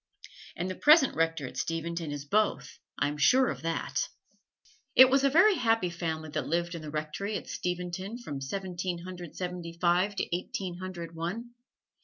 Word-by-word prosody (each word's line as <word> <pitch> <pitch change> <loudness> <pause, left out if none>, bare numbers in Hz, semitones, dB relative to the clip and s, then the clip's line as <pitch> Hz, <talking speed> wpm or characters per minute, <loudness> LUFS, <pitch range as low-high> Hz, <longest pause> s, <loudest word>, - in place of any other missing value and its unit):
And 175 - -2
the 185 - -2
present 295 - +6
Rector 165 -2 0
at 130 0 -8
Steventon 165 -1 -2
is 145 -1 -5
both 215 +7 0 0.2
I'm 145 +1 -1
sure 255 - +5
of 130 -3 -4
that. 165 +1 -2 0.9
It 260 0 +9
was 275 0 +4
a 275 - +5
very 360 +9 +6
happy 225 - +2
family 160 -2 -4
that - - -2
lived 170 +2 0
in 170 - -5
the 155 - -7
Rectory 155 +8 -3
at - - -9
Steventon 180 +4 -3
from 145 - -6
Seventeen 180 +3 -4
Hundred 180 -2 -8
Seventy 180 -2 -5
five 180 +3 +2
to 175 - -1
Eighteen 180 0 -4
Hundred 175 -3 -6
One. 185 +9 -4
175 Hz, 170 wpm, -29 LUFS, 165-200 Hz, 0.9 s, It